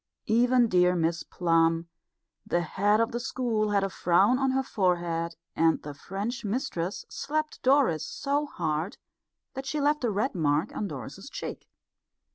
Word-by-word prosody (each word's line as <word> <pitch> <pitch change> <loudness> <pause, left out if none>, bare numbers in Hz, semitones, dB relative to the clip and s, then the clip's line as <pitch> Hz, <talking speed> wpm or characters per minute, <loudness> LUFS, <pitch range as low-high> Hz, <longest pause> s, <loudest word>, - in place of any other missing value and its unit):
Even 240 +2 +4
dear 180 -2 +4
Miss 165 0 0
Plum, 165 -1 +1 0.6
the 175 - 0
head 205 +6 +2
of 230 +2 +1
the 240 - -2
school, 235 -4 -1
had 200 -1 +2
a 195 - 0
frown 195 +10 +3
on 270 -1 +2
her 265 +1 +1
forehead, 170 -6 0 0.2
and 165 0 +3
the 145 - -6
French 200 - -5
mistress 200 -5 -2
slapped 310 +1 -3
Doris 260 - +3
so 290 +1 -1
hard 160 - -2 0.6
that 265 0 -6
she 295 +2 -1
left 295 0 +1
a 240 - +2
red 215 +6 0
mark 155 +2 0
on 210 - -2
Doris's 135 - -8
cheek. - - -7
200 Hz, 155 wpm, -28 LUFS, 170-250 Hz, 0.6 s, Even